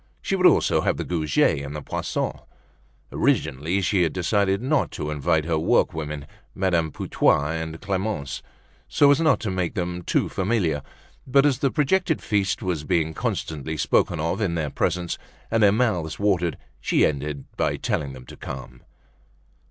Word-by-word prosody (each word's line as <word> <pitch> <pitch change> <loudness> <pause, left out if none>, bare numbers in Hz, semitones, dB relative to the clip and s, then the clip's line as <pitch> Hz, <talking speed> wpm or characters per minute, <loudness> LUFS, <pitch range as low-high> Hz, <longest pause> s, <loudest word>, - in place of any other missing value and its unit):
She 195 - -1
would 185 -1 +6
also - - +3
have - - 0
the - - -2
Goujets 75 -4 +1
and 70 +1 -6
the 75 - -4
Poissons. - - -3 0.7
Originally, 80 +9 +1
she 95 +1 +2
had 85 -3 +1
decided 95 +2 +1
not 135 +5 +1
to 75 -1 -4
invite 75 +1 +1
her 80 -2 0
workwomen, 75 -2 0 0.3
Madame 85 -4 +1
Putois 75 +1 +1
and 80 0 -6
Clemence, 95 -7 -3 0.5
so 145 -1 +5
as 145 - +3
not 155 -5 +4
to 110 - -2
make 90 -2 -2
them 90 0 -2
too - - +1
familiar; 90 -7 0 0.5
but 135 +2 +4
as 135 -4 +2
the 140 - +2
projected 160 +4 +1
feast 100 -3 0
was 90 -5 -1
being 80 -1 0
constantly 80 0 -3
spoken 75 - +2
of 85 +7 -1
in 90 -5 0
their 75 -4 -2
presence, 90 +3 -1 0.3
and 115 0 +2
their 105 -2 +6
mouths 105 -8 0
watered, 90 -5 +1 0.2
she - - +3
ended 70 -1 -2
by - - 0
telling 70 -2 -2
them 65 -1 -11
to - - -11
come. 65 0 -8
85 Hz, 165 wpm, -24 LUFS, 75-105 Hz, 0.7 s, would